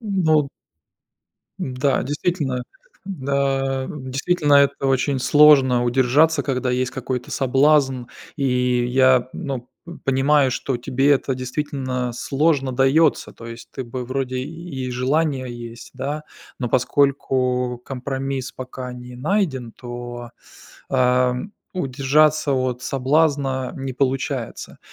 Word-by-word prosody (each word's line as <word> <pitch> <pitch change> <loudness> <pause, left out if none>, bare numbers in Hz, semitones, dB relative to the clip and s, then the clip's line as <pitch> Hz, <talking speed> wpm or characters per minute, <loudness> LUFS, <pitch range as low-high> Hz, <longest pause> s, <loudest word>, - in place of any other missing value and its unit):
Ну 170 -9 +2 1.1
Н-да, 130 +1 0
действительно 145 -3 -2 0.4
да, 135 -5 -1
действительно 145 +3 0
это 140 -1 +4
очень 135 +1 +1
сложно 130 -3 +5
удержаться, 135 +5 +3
когда 130 -2 -1
есть 125 0 0
какой-то 125 -1 -4
соблазн, 135 -1 +2 0.3
и 125 -3 +1
я 130 0 +4
ну, 130 -3 -5 0.2
м, 170 - -9
понимаю, 135 +1 +3
что 130 0 -2
тебе 135 +3 +1
это 135 -1 +2
действительно 130 -1 -3
сложно 135 0 +1
даётся. 135 +4 +2
То 115 - -12
есть, 115 0 -9
ты 130 - -5
бы 125 +1 -5
вроде 130 -1 -2
и 140 -2 -5
желание 130 0 0
есть, 120 0 -9
да, 145 +4 -4 0.3
но 125 -2 -2
поскольку 125 -1 +1
компромисс 135 0 -4
пока 130 0 -7
не 125 0 -10
найден, 135 - -1
то, 120 -1 -8 0.6
ам, 125 +6 +1 0.2
удержаться 145 +1 +2
от 130 -1 -1
соблазна 135 -1 +1
не 135 -1 -4
получается. 130 -2 -2
130 Hz, 110 wpm, -21 LUFS, 125-145 Hz, 1.1 s, сложно